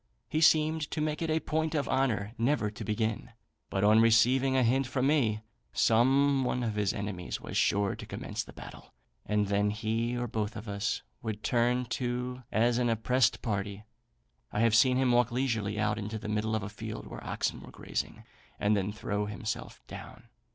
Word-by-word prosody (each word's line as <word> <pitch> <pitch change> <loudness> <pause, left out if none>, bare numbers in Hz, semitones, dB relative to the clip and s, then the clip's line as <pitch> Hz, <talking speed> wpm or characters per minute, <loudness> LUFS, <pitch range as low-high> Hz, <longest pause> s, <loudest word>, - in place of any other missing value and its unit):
He 155 - -1
seemed 155 -1 +4
to - - -3
make 155 0 -1
it 165 - -1
a 160 0 +2
point 160 0 -1
of 145 - 0
honour 120 -6 0
never 115 -3 +1
to 110 +1 -8
begin, 110 +3 -2 0.4
but 95 - -1
on 105 +2 +6
receiving 125 +4 +4
a 130 - +4
hint 130 +3 +2
from 130 +1 0
me; 120 -8 +2 0.3
some 135 +4 +4
one 125 0 -1
of 110 -2 -1
his 105 -2 +1
enemies 100 -3 -4
was - - -8
sure 100 -1 +2
to - - -9
commence - - -4
the - - -13
battle, - - -12 0.3
and 105 -1 +2
then 100 +1 +1
he 115 +3 -1
or 120 - -1
both 110 -1 -3
of 110 +1 -7
us 100 0 -2 0.2
would 110 -1 -5
turn 125 +1 +2
to 125 +1 -3
as 120 +2 +2
an 120 -1 +2
oppressed 115 +2 +2
party. 100 -2 -3 0.7
I 105 - 0
have 115 -1 +4
seen 125 +3 +5
him 130 -1 +3
walk 120 0 +3
leisurely 115 -5 -1
out 105 0 0
into 105 +1 -4
the 110 0 -7
middle 105 +1 0
of 110 - -2
a 95 - -4
field 110 +1 -7
where - - -9
oxen - - -2
were - - -11
grazing, - - -5 0.4
and 105 +1 +3
then 100 0 -1
throw 105 0 -2
himself 105 +1 -5
down. 115 +1 -11
115 Hz, 195 wpm, -30 LUFS, 105-130 Hz, 0.7 s, on